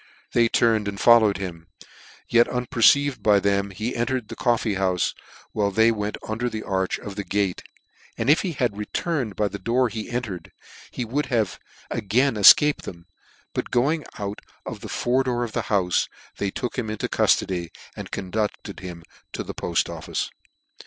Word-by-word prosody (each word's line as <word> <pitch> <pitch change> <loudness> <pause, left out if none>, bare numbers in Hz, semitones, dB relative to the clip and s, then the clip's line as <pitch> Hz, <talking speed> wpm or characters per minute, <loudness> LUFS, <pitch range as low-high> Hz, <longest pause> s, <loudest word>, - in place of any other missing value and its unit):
They 115 -1 +3
turned 110 -3 +2
and 100 -1 -4
followed 115 -4 +6
him: 85 -4 -7 0.6
yet, 120 0 +4
unperceived 125 +3 +3
by 105 -2 +5
them, 100 0 +1
he 110 +5 -4
entered 120 -1 -1
the - - -6
coffee 120 -3 +1
houfe, 95 -2 0 0.4
while 105 -2 +1
they 110 +3 +4
went 105 -1 -3
under 115 +3 -1
the 110 -2 -5
arch 95 -1 -1
of 100 -2 -8
the 100 - -3
gate, 100 -2 -1 0.6
and 115 - -2
if 150 +3 +5
he 180 -4 -2
had 125 -7 0
returned 115 - -2
by 105 - +1
the 100 - -6
door 120 +5 +1
he 110 -1 -6
entered, 115 -8 -4 0.4
he 125 - -4
would 140 +6 -1
have 110 -6 0 0.3
again 120 +7 +1
efcaped 130 +8 +7
them; 85 -2 -9 0.5
but - - -3
going 145 +6 +1
out 100 0 -5 0.2
of - - -6
the - - -8
fore 125 +2 +1
door 120 -2 -1
of 115 - -4
the - - -3
houfe, 95 -4 +2 0.3
they 100 - -1
took 125 +5 -4
him 110 -3 -3
into 110 - -2
cuftody, 90 -3 +1 0.3
and - - -7
conducted 100 +1 -3
him 90 -3 -8 0.3
to - - -3
the - - -7
Poft - - 0
office. - - -4
110 Hz, 175 wpm, -24 LUFS, 100-120 Hz, 0.6 s, efcaped